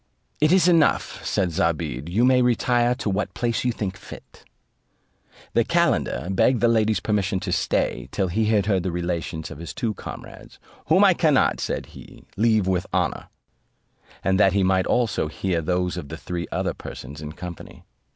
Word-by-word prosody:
"It 155 +1 +3
is 185 -1 +5
enough," 165 -4 +2
said 90 -3 0
Zobeide; 80 -4 -1
"you 110 +8 +2
may 130 0 +4
retire 120 0 +2
to 130 - -5
what 100 +1 -2
place 120 -1 -1
you 125 - +1
think 100 -4 -4
fit." - - -13 1.1
The - - +3
calender 70 +7 +1
begged 120 +6 +3
the 120 - +3
ladies' 110 -3 +2
permission 100 -1 0
to - - -3
stay - - -1
till 95 - 0
he 110 +5 0
had 105 -2 +2
heard 100 -3 +1
the 90 0 -2
relations 85 -2 -3
of - - -9
his 85 - -7
two 120 -5 -1
comrades, - - -10 0.3
"Whom - - +5
I - - +6
cannot," - - +2
said - - -3
he, - - -13
"leave 110 -1 +2
with 95 -1 0
honour;" - - -1 1.0
and 95 +1 +2
that 95 -3 +5
he 100 -1 +2
might 95 0 +2
also 115 -10 +1
hear 85 +2 -2
those 90 +2 -1
of 75 -5 -6
the 80 - -6
three 85 0 -5
other - - -1
persons 70 +3 -9
in 75 0 -7
company. 90 0 -9
95 Hz, 180 wpm, -23 LUFS, 85-115 Hz, 1.1 s, I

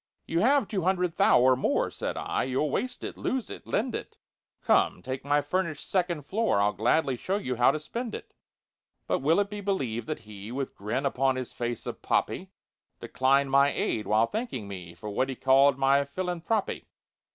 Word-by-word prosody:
"You 165 - 0
have 260 +3 +3
two 195 -4 -2
hundred 180 -1 +1
'thou' - - +5
or 130 +1 +5
more," 130 - 0
Said - - -4
I. - - -1
"You'll 130 +3 0
waste 255 - -3
it, - - -6
lose 260 -3 -2
it, - - -9
lend 235 +3 0
it; - - -6 0.5
Come, - - +2
take 130 +1 -4
my 145 +1 +2
furnished 155 0 -2
second 175 -5 0
floor, 215 - +1
I'll 105 +1 +2
gladly 135 +5 +2
show 190 +11 -2
you 130 -11 -3
how 120 - +5
to 155 - 0
spend 230 +8 -5
it." - - -10 0.7
But - - 0
will 160 +7 +3
it 205 0 0
be 205 0 -5
believed 130 - -2
that 155 - -2
he, 105 +1 -9
With 135 +1 -3
grin 115 +8 -2
upon 135 -1 +1
his 130 -1 -5
face 120 0 -4
of - - -6
poppy, - - 0 0.5
Declined 135 +1 +2
my 140 +1 +5
aid, 110 - -1
while 110 +2 +4
thanking 215 - -4
me 90 -4 -8
For 105 - -9
what 130 +6 0
he 130 - -3
called 135 +1 +4
my 135 +1 +4
"philanthroppy"? 180 +7 -2
140 Hz, 195 wpm, -28 LUFS, 125-185 Hz, 0.7 s, thou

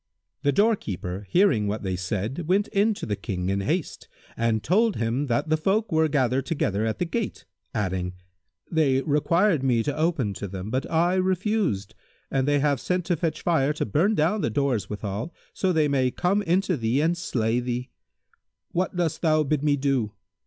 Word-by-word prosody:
The 145 - +2
doorkeeper, 105 - 0
hearing 175 - +3
what 105 +1 -3
they 95 -1 -1
said 105 - -3
went 195 +3 +2
in 210 +2 +2
to - - -6
the 105 - -1
King 95 -3 -3
in 100 0 0
haste 160 - -2 0.3
and 115 -2 0
told 220 +3 +3
him 120 +5 -1
that 120 +5 0
the 155 - +3
folk 200 +7 0
were 160 0 +3
gathered 135 -2 +1
together 110 - 0
at 110 - -2
the 180 - -1
gate, 220 +5 -3 0.3
adding, 95 -4 -2 0.6
"They 140 -5 +2
required 165 +3 +2
me 125 -4 +2
to 145 - -2
open 155 - 0
to 100 - -5
them, 95 +2 -6
but 130 +2 -1
I 170 +2 +2
refused; 185 - 0 0.4
and 135 0 +1
they 145 0 +3
have 140 -2 +1
sent 180 +4 -1
to 175 - +1
fetch 165 0 -2
fire 150 -4 +2
to 150 - -2
burn 170 - +2
down 175 +7 +1
the - - 0
doors 125 -4 0
withal, 105 - -4 0.2
so 190 - 0
they 155 -3 +3
may 135 -3 +2
come 185 +10 +1
into 185 -1 +1
thee 115 +2 +1
and 165 +3 +2
slay 120 -8 0
thee. 125 0 -3 0.8
What 185 +1 -1
dost 170 -3 -1
thou 155 -2 +3
bid 150 0 0
me 145 -1 +2
do?" 135 -6 0
145 Hz, 190 wpm, -25 LUFS, 110-175 Hz, 0.8 s, hearing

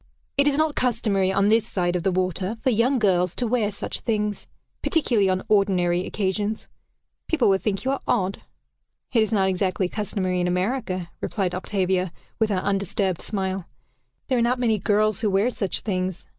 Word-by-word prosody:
It 280 +1 +3
is 285 -1 +2
not 310 -1 +2
customary, 210 -7 +1
on 195 +1 +2
this 225 0 +3
side 175 -2 -1
of 180 - 0
the 190 +2 +1
water, 185 +3 -1
for 260 - +3
young 245 +4 +2
girls 180 -5 +2
to 245 - -1
wear 230 -3 +1
such 205 - -4
things 210 -3 -2 0.3
particularly 235 - +2
on 185 0 0
ordinary 185 -4 +2
occasions. 205 +2 -2 0.6
People 320 -9 +2
will 195 0 +3
think 200 +2 -2
you 265 - +2
are 275 - -2
odd." 195 -5 0 0.7
"It 230 - +4
is 220 - +1
not 195 -3 +3
exactly 185 0 0
customary 185 -2 -1
in 175 - +1
America," 185 -1 -1
replied 190 -4 -1
Octavia, 185 -1 0 0.3
with 220 -1 +2
her 190 -3 0
undisturbed 195 -2 0
smile. 190 -3 -2 0.6
"There 255 -2 +1
are - - +2
not 240 +2 +2
many 225 -4 +1
girls 215 +1 +1
who 205 -4 +1
have 235 +5 +2
such 195 -3 -2
things. 185 -3 -2
200 Hz, 180 wpm, -24 LUFS, 185-225 Hz, 0.7 s, It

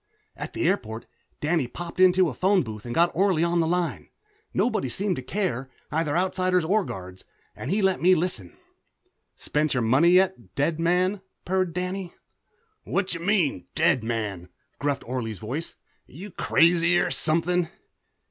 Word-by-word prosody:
At - - -7
the 340 - 0
airport 115 - -1 0.4
Danny 150 -3 +1
popped 170 +8 -8
into 185 0 +5
a 145 - -3
phone 190 +2 +2
booth 110 -1 -8
and 120 - -4
got 170 +1 +4
Orley 185 -2 +2
on 170 0 +1
the 165 - +2
line 175 0 -1 0.4
nobody 210 - 0
seemed 195 - 0
to - - -3
care, 135 - -2 0.2
either 155 0 0
Outsiders 185 -1 +1
or 205 +5 +2
guards 95 - -8 0.3
and 130 - -6
he 200 +3 +1
let 190 -1 +2
me 185 +1 +6
listen. 155 - -3 0.8
"Spent 150 -1 -1
your 125 - +1
money 130 +9 +4
yet, 180 - +2
dead 155 +4 0
man?" 180 +4 +1 0.2
purred 185 -1 0
Danny. 180 0 -4 0.7
"Whacha 185 -3 -1
mean, 170 - 0
dead 130 -5 +3
man?" 105 -6 -3 0.3
gruffed 145 -1 -1
Orley's 115 -4 -3
voice. 130 - -5 0.3
"You 185 +9 -10
crazy 170 +1 +3
or - - 0
something?" 170 +2 +1
170 Hz, 155 wpm, -25 LUFS, 130-185 Hz, 0.8 s, me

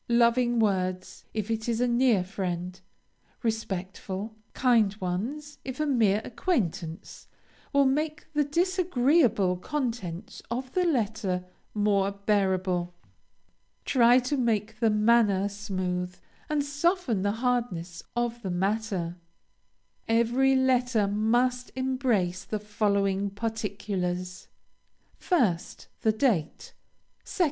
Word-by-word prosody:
Loving 240 +1 +3
words, 185 -4 -1
if 215 0 -3
it 225 +1 -2
is 230 -1 0
a 245 - +2
near 240 -5 +3
friend, 180 -1 -4 0.6
respectful, 205 -1 -3 0.2
kind 230 -6 +3
ones 250 +12 -4
if 260 0 -6
a 305 - +1
mere 220 -7 +2
acquaintance, 185 - -3 0.4
will 280 0 +4
make 300 +3 0
the 295 0 +3
disagreeable 290 - +2
contents 220 - -4
of 255 +2 -4
the 365 -1 +2
letter 215 - 0 0.3
more 205 -2 +2
bearable. 190 -3 0 0.9
Try 245 -1 +5
to 255 +4 -1
make 220 -3 0
the 225 - +3
manner 210 -2 +3
smooth 185 -3 -3 0.3
and 295 -2 +1
soften 290 - 0
the 205 +1 +1
hardness 225 -8 -2
of 240 0 -1
the 195 - -4
matter. 190 -2 -1 0.9
Every 240 +4 +3
letter 250 -4 +2
must 240 +5 +1
embrace 255 -9 0
the 215 - -3
following 200 -1 0
particulars: 195 -4 -3 0.7
1st. 225 - 0
The 220 - +3
date. 215 - 0 0.5
2d. - - -9
220 Hz, 105 wpm, -27 LUFS, 190-250 Hz, 0.9 s, Try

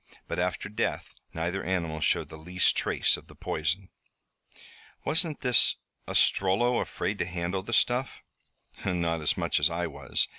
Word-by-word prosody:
But - - -3
after 90 +3 -1
death 105 +1 -2 0.2
neither 85 +4 -2
animal 85 -4 -1
showed - - +2
the 80 - -9
least 90 +4 +2
trace - - +2
of - - -14
the - - -15
poison." 85 +5 -2 1.2
"Wasn't 160 0 +1
this 125 -3 +4 0.3
Ostrello 115 +6 +3
afraid 100 +1 -3
to 90 - +1
handle 90 +1 -2
the 105 - -8
stuff?" 125 +3 +1 0.6
"Not 85 -3 0
as 75 - +1
much - - +1
as 75 +4 +4
I 85 +1 -1
was. 70 -5 -1
90 Hz, 150 wpm, -28 LUFS, 85-100 Hz, 1.2 s, this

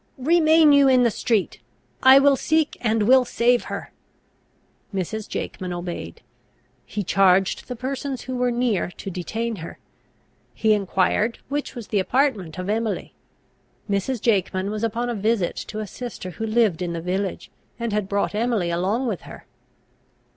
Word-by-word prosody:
"Remain 315 +2 +5
you 280 -1 +6
in 255 -2 +5
the 235 - +3
street! 215 -2 -1 0.4
I 265 +1 +8
will 275 0 +5
seek, 315 +3 +1
and 225 -2 +1
will 255 +4 +6
save 245 0 +2
her!" - - -6 1.0
Mrs. 200 +2 -4
Jakeman 185 -1 -5
obeyed. 175 0 -6 0.6
He 210 - -3
charged 190 0 +2
the 250 - -5
persons 265 +2 -4
who 255 0 -5
were 250 0 +1
near 240 -6 0
to 195 - -6
detain 220 +6 -3
her; 165 -1 -8 0.8
he 220 -1 +3
enquired 205 +3 +1
which 290 0 -3
was 235 -3 -8
the 205 - +1
apartment 210 - 0
of 185 0 -4
Emily. 220 0 -2 0.7
Mrs. 205 +5 -1
Jakeman 195 -3 0
was 215 +1 -4
upon 230 +2 -1
a 240 - -1
visit 210 -3 0
to 215 0 -5
a - - -4
sister 210 -3 -7
who 225 +7 -5
lived 215 -6 +2
in 175 -1 -2
the 170 - -3
village, 185 +2 -3 0.3
and 235 -2 -2
had 210 -2 -1
brought 200 0 0
Emily 215 -5 0
along 195 +9 0
with 215 -7 -2
her. - - -11
220 Hz, 160 wpm, -23 LUFS, 190-250 Hz, 1.0 s, I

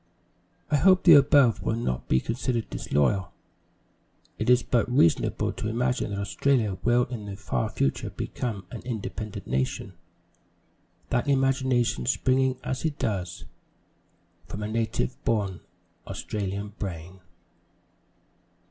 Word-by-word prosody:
I 150 - +4
hope 185 +5 +5
the 170 - +9
above 140 -4 +6
will 110 - 0
not 65 - -3
be 65 - +3
considered 115 - -2
disloyal. 85 +5 0 1.1
It 110 - 0
is 125 -1 +5
but 120 0 +1
reasonable 85 - +2
to - - -4
imagine 120 +2 0
that 100 -1 -3
Australia 110 -2 +1
will 120 +1 +3
in 115 -4 -7
the 100 - -5
far 65 -10 -2
future 70 - -1
become 105 -7 -4
an 120 - -7
independent 110 -3 -5
nation 65 +8 -2 1.2
that 120 +2 +1
imagination 130 -3 +1
springing 130 +1 +2
as 130 - -3
it 155 -3 -1
does 90 -5 -3 1.0
from 100 +4 -6
a - - -2
native 110 - -2
born 100 -5 0 0.5
Australian 100 0 -4
brain. 90 -1 -6
115 Hz, 120 wpm, -26 LUFS, 100-125 Hz, 1.2 s, the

